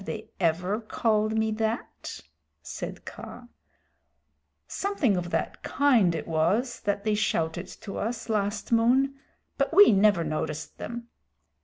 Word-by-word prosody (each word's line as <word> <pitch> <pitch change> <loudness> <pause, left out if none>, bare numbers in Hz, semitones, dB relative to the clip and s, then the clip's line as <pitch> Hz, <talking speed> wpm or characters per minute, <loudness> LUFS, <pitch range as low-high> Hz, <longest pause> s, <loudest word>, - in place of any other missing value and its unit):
"Sssss! 195 - -12
Have - - -2
they 215 - -14
ever 180 +4 +1
called 215 0 0
me 220 0 +1
that?" 220 +2 -3 0.4
said - - -7
Kaa. 245 0 -9 1.2
"Something 320 - 0
of 175 -1 -2
that 165 -2 -2
kind 240 -12 +3
it 160 - -5
was 180 +10 +1
that 200 0 -1
they 215 - +1
shouted 175 -4 0
to 200 - -6
us 225 +2 -3
last 210 -1 -1
moon, 250 +4 +4 0.5
but 275 - +1
we 410 +1 +9
never 200 -3 +4
noticed 155 0 -4
them. 235 +1 -6
215 Hz, 140 wpm, -27 LUFS, 180-235 Hz, 1.2 s, we